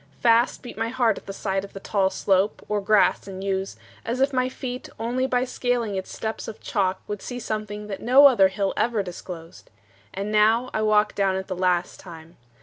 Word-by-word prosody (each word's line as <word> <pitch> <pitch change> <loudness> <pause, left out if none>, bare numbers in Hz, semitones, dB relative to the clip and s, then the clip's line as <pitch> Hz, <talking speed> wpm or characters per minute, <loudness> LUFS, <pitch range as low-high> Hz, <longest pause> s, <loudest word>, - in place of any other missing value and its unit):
Fast 235 +1 +3
beat 240 -3 -9
My 225 0 0
heart 235 -4 +1
at - - -26
the - - -4
sight 195 -1 -2
of 200 - -10
the 195 - -7
tall 195 -1 +1
slope 190 +1 0
Or 210 -1 -1
grass 205 -1 +3
and 190 0 -7
yews, 195 0 -2 0.3
as 235 +3 -3
if 270 +1 +2
my 255 0 +1
feet 250 -1 -6
Only 245 +3 -1
by 250 -1 +1
scaling 245 -4 -1
its 190 -1 -4
steps 220 0 -4
of 220 - -7
chalk 190 -4 -1
Would 210 -1 -5
see 245 - -6
something 215 -2 -4
no 260 +4 +6
other 235 -9 +7
hill 195 +1 -2
Ever 225 -3 +1
disclosed. 175 -2 -9 0.4
And 200 +2 -4
now 220 +4 +3
I 220 - 0
walk 215 0 +3
Down 195 -1 +1
it 190 0 -3
the 185 - -4
last 180 -1 0
time. 165 -2 -12
210 Hz, 205 wpm, -24 LUFS, 190-235 Hz, 0.4 s, other